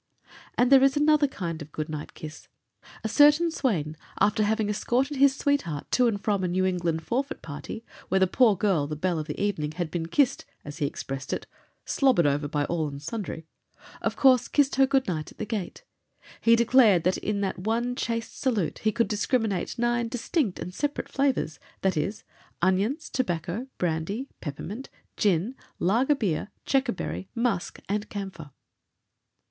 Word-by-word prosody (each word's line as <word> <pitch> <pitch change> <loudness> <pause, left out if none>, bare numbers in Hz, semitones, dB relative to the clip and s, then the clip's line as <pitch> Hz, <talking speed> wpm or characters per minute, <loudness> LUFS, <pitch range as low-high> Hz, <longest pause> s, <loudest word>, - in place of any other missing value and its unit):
And 245 +2 +3
there 270 -1 +8
is 275 +1 +4
another 300 0 +4
kind 170 -10 -5
of 150 0 -9
good 155 0 -3
night 150 -1 -6
kiss. 155 0 -9 0.6
A - - 0
certain 295 +7 +5
swain, 170 - -1 0.2
after 210 +1 +3
having 215 0 +1
escorted 255 +7 0
his 275 0 +5
sweetheart 270 - -1
to 250 -1 +4
and 210 -3 0
from 200 -2 0
a - - +1
New 185 +2 +1
England 170 -3 0
forfeit 265 +8 -2
party, 160 +9 -7 0.2
where 190 - +3
the 190 - +5
poor 220 +3 +4
girl, 185 -7 +1
the 150 - -4
belle 170 +2 0
of 155 - -5
the 150 - -5
evening, 155 -7 -1
had 175 -1 -3
been 165 -2 -2
kissed, 260 - +2 0.2
as 145 +2 -8
he 145 - +1
expressed 135 -1 -5
it, - - -3 0.4
"slobbered 260 - +3
over 145 +1 +1
by 145 0 0
all, 165 -1 -1
and 140 0 -8
sundry," 165 -2 -5 0.6
of - - -1
course 255 -2 +5
kissed 285 -2 +2
her 270 0 +6
good 270 -1 +2
night 155 -4 -3
at - - -18
the 215 - -3
gate. 210 - -4 0.6
He 230 0 +6
declared 230 -7 +5
in 205 -1 -2
that 195 -2 -2
one 230 +5 -1
chaste 230 -2 -3
salute 225 - 0
he 215 - +1
could 230 - +1
discriminate 215 -3 0
nine 240 0 +1
distinct 235 - -1
and 175 +2 -6
separate 290 +7 -2
flavors, 270 - 0 0.2
viz., 190 +1 0 0.4
onions, 195 - +1
tobacco, 180 0 -2
brandy, 180 +10 -2
peppermint, 190 - -6 0.3
gin, 200 +3 +1 0.2
lager 240 - +3
beer, 205 - -1 0.2
checkerberry, 260 -8 -1
musk, 235 -6 -1
and 210 +1 -2
camphor. 190 -7 -6
205 Hz, 170 wpm, -27 LUFS, 170-250 Hz, 0.6 s, there